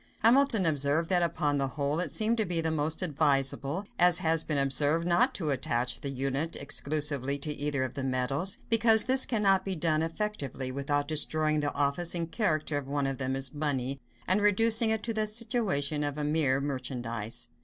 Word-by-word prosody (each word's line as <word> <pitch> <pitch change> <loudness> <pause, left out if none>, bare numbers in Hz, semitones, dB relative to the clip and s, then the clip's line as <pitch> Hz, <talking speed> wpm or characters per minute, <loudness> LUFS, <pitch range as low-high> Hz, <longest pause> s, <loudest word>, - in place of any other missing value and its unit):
Hamilton 235 -3 +4
observed 150 +1 +2
that 180 -2 +2
"upon 145 -4 -1
the 135 - 0
whole, 140 +3 -2
it 180 - -1
seems 220 +2 +1
to 220 - +1
be 175 -2 -2
most 160 +1 -1
advisable, 145 +2 0
as 175 0 +5
has 160 0 +1
been 150 - -2
observed, 145 +4 +1
not 230 +10 +2
to 160 -7 -1
attach 125 -2 -2
the 140 - -3
unit 135 +4 -2
exclusively 140 -1 -1
to 150 +1 -2
either 145 -2 -2
of 130 - -4
the 140 - -5
metals; 135 - 0
because 225 -1 +5
this 260 +1 +5
cannot 195 -5 +2
be 190 -1 -3
done 155 -1 0
effectually, 160 - -4
without 145 +2 -2
destroying 155 0 +1
the 145 -1 -1
office 145 +5 +1
and 165 -1 -3
character 155 -9 -1
of 135 - -10
one 140 0 -2
of 135 0 -3
them 130 0 -2
as 135 +1 -2
money, 140 -3 -3 0.3
and 190 +3 +3
reducing 220 +2 +3
it 220 -1 -1
to 230 - -2
the 215 -1 -1
situation 210 - -1
of 145 0 -3
a 150 - -3
mere 145 -3 +1
merchandise." 120 -5 -5
150 Hz, 185 wpm, -28 LUFS, 140-185 Hz, 0.3 s, as